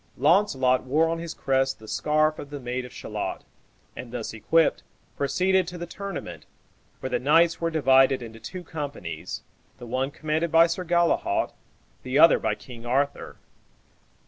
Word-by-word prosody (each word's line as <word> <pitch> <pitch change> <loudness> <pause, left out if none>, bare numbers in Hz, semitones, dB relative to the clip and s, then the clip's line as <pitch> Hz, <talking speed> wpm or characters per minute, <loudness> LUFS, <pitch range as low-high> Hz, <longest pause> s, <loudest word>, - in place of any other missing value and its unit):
Launcelot 135 - +3
wore 150 +5 +2
on 165 0 -2
his 170 -1 -6
crest 135 0 0
the 110 - -14
scarf 155 +4 +1
of 145 - -8
the 145 -1 -6
maid 125 0 -4
of 125 - -11
Shalott, - - -5 0.5
and, 120 - -8
thus 120 -3 -5
equipped, 160 +9 +2 0.3
proceeded 185 +6 +1
to 180 0 -6
the 175 - -5
tournament, 200 +2 -7 0.5
where 130 - -4
the - - +1
knights 165 +5 +3
were 165 - +1
divided 135 -4 +4
into 115 -1 -10
two 180 +11 -8
companies, 140 - -6 0.3
the 120 - -10
one 130 +3 -1
commanded 155 +3 -2
by 165 0 +7
Sir 170 +2 -3
Galehaut, 170 0 +1 0.5
the 130 +2 -2
other 165 - +7
by 110 -1 0
King 115 +1 -12
Arthur. 140 +4 -1
145 Hz, 160 wpm, -25 LUFS, 125-165 Hz, 0.5 s, by